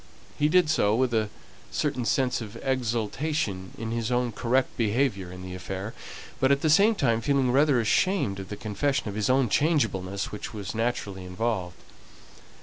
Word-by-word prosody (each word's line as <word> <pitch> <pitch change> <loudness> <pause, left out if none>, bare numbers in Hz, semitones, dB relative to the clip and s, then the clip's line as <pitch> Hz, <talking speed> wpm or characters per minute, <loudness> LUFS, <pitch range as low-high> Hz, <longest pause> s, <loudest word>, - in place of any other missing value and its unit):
He 150 0 +2
did 180 0 +4
so 110 -9 +2
with 125 0 +1
a 110 -2 +1 0.4
certain 140 -5 -1
sense 125 0 +1
of 105 -2 -8
exultation 120 -4 -1
in 115 0 -4
his 115 0 -2
own 125 -1 +1
correct 125 +4 0
behaviour 110 -5 0
in 90 0 -9
the 90 0 -7
affair, 95 +3 -5 0.5
but 135 +1 +3
at 140 0 +3
the 155 - +3
same 205 +8 +5
time 115 - +1
feeling 135 0 +2
rather 140 0 +4
ashamed 115 - +1
of 95 -1 -7
the 105 - -5
confession 110 +4 -1
of - - -5
his 105 +2 -1
own 130 -1 +4
changeableness 105 - 0
which 105 +2 -6
was 100 -2 -5
naturally 110 -5 -2
involved. 90 -1 -2
115 Hz, 170 wpm, -27 LUFS, 100-135 Hz, 0.5 s, same